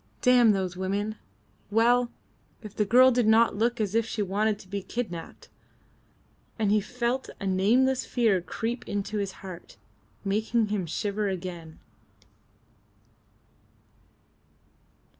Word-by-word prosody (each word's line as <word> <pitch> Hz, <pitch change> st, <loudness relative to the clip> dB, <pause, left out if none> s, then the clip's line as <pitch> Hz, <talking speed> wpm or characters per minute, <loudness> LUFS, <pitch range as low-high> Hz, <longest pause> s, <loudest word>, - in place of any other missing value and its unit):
"Damn 245 Hz, -3 st, +6 dB
those 185 Hz, -2 st, -2 dB
women! 200 Hz, +3 st, -2 dB, 0.5 s
Well! 235 Hz, +3 st, +3 dB, 0.5 s
If 210 Hz, -2 st, -10 dB
the 210 Hz, -, +1 dB
girl 255 Hz, +5 st, +6 dB
did 245 Hz, -2 st, +1 dB
not 225 Hz, 0 st, +4 dB
look 235 Hz, +2 st, 0 dB
as 210 Hz, -2 st, -1 dB
if 230 Hz, +1 st, +3 dB
she 220 Hz, -1 st, -3 dB
wanted 205 Hz, +2 st, 0 dB
to 190 Hz, -, -15 dB
be 200 Hz, +1 st, -4 dB
kidnapped!" 190 Hz, -4 st, -6 dB, 1.1 s
And 215 Hz, -3 st, +1 dB
he 210 Hz, 0 st, +3 dB
felt 250 Hz, +4 st, -2 dB
a 200 Hz, -, -5 dB
nameless 235 Hz, +8 st, +2 dB
fear 220 Hz, -7 st, +1 dB
creep 230 Hz, +7 st, -4 dB
into 205 Hz, +1 st, -2 dB
his 200 Hz, -1 st, -2 dB
heart, 180 Hz, -, -10 dB, 0.5 s
making 215 Hz, +2 st, 0 dB
him 200 Hz, -4 st, -2 dB
shiver 205 Hz, +5 st, -2 dB
again. 175 Hz, -4 st, -6 dB
210 Hz, 120 wpm, -27 LUFS, 195-235 Hz, 1.1 s, Damn